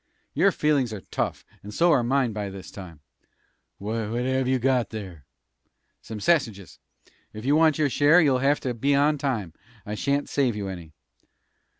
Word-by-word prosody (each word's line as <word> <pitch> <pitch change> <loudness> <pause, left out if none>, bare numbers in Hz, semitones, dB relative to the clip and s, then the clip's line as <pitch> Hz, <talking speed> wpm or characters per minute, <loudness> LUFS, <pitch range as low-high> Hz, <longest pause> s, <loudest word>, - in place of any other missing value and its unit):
"Your - - +3
feelin's 145 -6 +1
are 105 - -6
tough, - - -3 0.2
and 105 - -9
so 170 +1 +4
are 140 -5 +4
mine 125 -1 +1
by 105 -1 -4
this 95 -1 -10
time." 85 -6 -11 0.8
"What 110 +2 -3
have 130 0 0
you 130 0 +2
got 125 -1 +1
there?" 95 -10 -8 0.8
"Some 110 -1 -8
sassiges. 110 - 0 0.6
Ef 110 +2 -8
you 140 +2 +3
want 160 -1 +4
your 155 -2 +2
share, 150 +6 +5
you'll 140 -6 +3
have 140 +3 +2
to 125 - -2
be 140 +5 +1
on 145 +1 +2
time. 115 - -2 0.3
I 105 - -5
shan't 140 +6 -1
save 130 -6 0
you 100 -2 -4
any." 85 -4 -9
125 Hz, 175 wpm, -25 LUFS, 105-140 Hz, 0.8 s, share